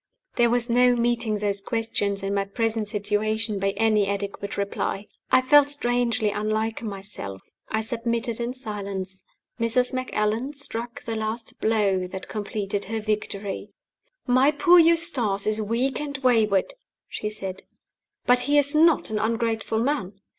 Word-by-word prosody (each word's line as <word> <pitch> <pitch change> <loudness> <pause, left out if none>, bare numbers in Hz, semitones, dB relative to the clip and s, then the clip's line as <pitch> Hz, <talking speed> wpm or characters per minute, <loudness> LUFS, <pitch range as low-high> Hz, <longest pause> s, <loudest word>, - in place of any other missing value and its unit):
There 235 -1 +4
was 240 0 +1
no 245 +1 +4
meeting 235 -2 0
those 200 -1 -1
questions, 205 -3 -2
in 195 0 -1
my 200 0 +1
present 225 +1 -1
situation, 210 +1 -1
by 195 +1 +1
any 215 -2 +3
adequate 200 0 -4
reply. 200 0 -2 0.3
I 255 - +5
felt 290 +2 +6
strangely 240 -5 +1
unlike 215 +2 -1
myself 195 - -7 0.3
I 220 - 0
submitted 235 +1 -2
in 240 +2 -3
silence. 200 -5 -5 0.4
Mrs. 245 +3 +1
Macallan 255 0 -1
struck 240 -4 -5
the 225 -2 -4
last 220 +1 -4
blow 200 -4 +1
that 190 +1 -8
completed 205 -1 -3
her 225 +2 -3
victory. 210 -2 -3 0.6
"My 255 +2 +4
poor 345 +4 +5
Eustace 320 - +3
is 215 0 0
weak 235 +5 0
and 285 -2 -4
wayward," 220 - +3 0.3
she 210 - -4
said; 195 -3 -6 0.6
"but 250 0 +5
he 290 - +4
is 285 0 +5
not 315 -5 +4
an 215 - 0
ungrateful 225 0 -1
man. 225 -6 -1
220 Hz, 145 wpm, -25 LUFS, 205-245 Hz, 0.6 s, felt